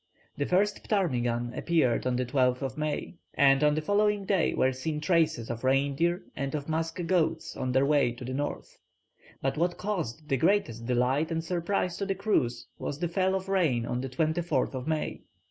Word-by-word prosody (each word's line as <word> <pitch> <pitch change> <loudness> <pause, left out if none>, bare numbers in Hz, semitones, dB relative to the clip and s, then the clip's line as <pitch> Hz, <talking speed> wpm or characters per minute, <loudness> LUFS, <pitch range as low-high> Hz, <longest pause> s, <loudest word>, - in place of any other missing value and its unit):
The 145 - -2
first 200 +3 +1
ptarmigan 120 - 0
appeared 130 -8 +1
on 125 - +1
the 125 +1 0
12th 125 +1 +1
May, 150 -1 -3 0.2
and 135 0 +5
on 150 0 +4
the 155 - -2
following 205 +2 +2
day 190 -3 +1
were 130 - +3
seen 150 +4 -3
traces 160 -8 +1
of 115 +1 -6
reindeer 140 +7 +1
and 140 +1 -3
of 145 -1 -4
musk 165 +2 -2
goats 170 -2 0
on 130 - -2
their 130 +2 +3
way 140 -4 +3
to 125 +1 -9
the 130 - -4
north; 145 +2 -4 0.6
but 135 +2 0
what 175 +2 0
caused 160 - -3
the 135 -3 +1
greatest 120 - +1
delight 130 +5 +1
and 165 -1 -2
surprise 175 +1 -1
to 200 - -3
the 195 - 0
crews 145 - 0
was 140 - -4
the 175 +2 -1
fall 190 +2 +1
of 190 0 -3
rain 160 -12 +1
on 125 +1 -2
the 135 - -4
24th 155 -3 -1
May. 155 -1 -2
150 Hz, 185 wpm, -28 LUFS, 130-175 Hz, 0.6 s, and